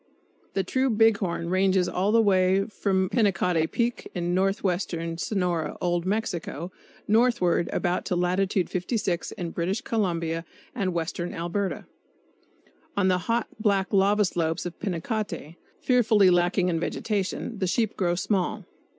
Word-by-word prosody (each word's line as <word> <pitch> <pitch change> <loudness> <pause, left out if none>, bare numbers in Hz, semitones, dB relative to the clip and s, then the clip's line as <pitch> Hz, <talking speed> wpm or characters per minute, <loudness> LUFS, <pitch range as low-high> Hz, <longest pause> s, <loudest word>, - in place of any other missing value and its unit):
The 195 - +1
true 260 +8 +1
big 225 -1 +4
horn 170 -3 -2
ranges 185 -1 +3
all 190 +3 0
the 230 0 +5
way 190 -1 +3
from 190 -3 0
Pinacate 180 -7 +1
Peak, 235 0 -1
in 175 0 -1
northwestern 180 -3 -1
Sonora, 175 -6 -1
Old 175 0 0
Mexico, 185 -5 -2 0.4
northward 215 -7 +3
about 180 -1 0
to 180 - -1
Latitude 185 +1 +1
56 185 -1 -2
in 175 -3 -5
British 180 +6 -1
Columbia 170 -6 -1 0.3
and 190 -7 -2
western 170 +1 -3
Alberta. 175 +4 -2 1.1
On 190 -2 +3
the 180 -1 +2
hot, 235 +1 +2
black 200 -3 +1
lava 200 +2 +4
slopes 165 -2 -1
of 175 - -6
Pinacate, 190 -3 -3 0.2
fearfully 220 -6 +4
lacking 175 +1 +2
in 165 -2 0
vegetation, 205 +4 -2
the 185 - 0
sheep 220 +3 0
grow 175 -2 +1
small. 190 +2 -1
185 Hz, 135 wpm, -26 LUFS, 175-205 Hz, 1.1 s, the